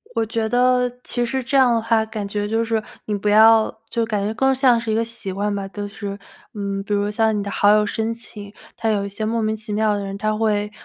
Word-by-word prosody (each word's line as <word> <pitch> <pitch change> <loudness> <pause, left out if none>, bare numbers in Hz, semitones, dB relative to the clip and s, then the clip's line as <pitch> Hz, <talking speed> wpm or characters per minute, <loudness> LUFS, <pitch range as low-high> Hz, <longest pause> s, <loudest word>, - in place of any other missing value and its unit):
我 225 -1 +1
觉 220 0 -2
得 250 0 +3
其 245 -1 -1
实 260 +2 -2
这 265 +3 -3
样 255 -3 +5
的 230 - +1
话， 225 -1 +2
感 215 -2 -5
觉 205 +1 -2
就 225 +1 +1
是 225 -1 0 0.2
你 210 - -2
不 205 +1 -1
要 220 +1 +5
就 230 - 0
感 210 -3 -2
觉 215 - -2
更 265 +4 +2
像 255 -3 +4
是 230 -1 -3
一 215 - +1
个 230 - +2
习 230 -4 -6
惯 205 +2 -2
吧。 195 -1 -4
就 205 +1 -6
是， 200 -1 -6 0.4
嗯， 200 -1 -3
比 205 - -3
如 205 0 +1
像 220 0 +1
你 - - -1
的 200 - -5
好 205 - +3
友 210 0 +4
申 225 +2 -2
请， 210 -3 -11 0.2
它 225 - -1
有 205 -2 0
一 - - -5
些 210 +2 -6
莫 230 +1 0
名 220 0 0
其 215 0 -8
妙 215 0 +2
的 200 - -3
人， 195 0 -5
他 215 +1 -1
会 210 -1 0
220 Hz, 280 characters per minute, -21 LUFS, 205-230 Hz, 0.4 s, 样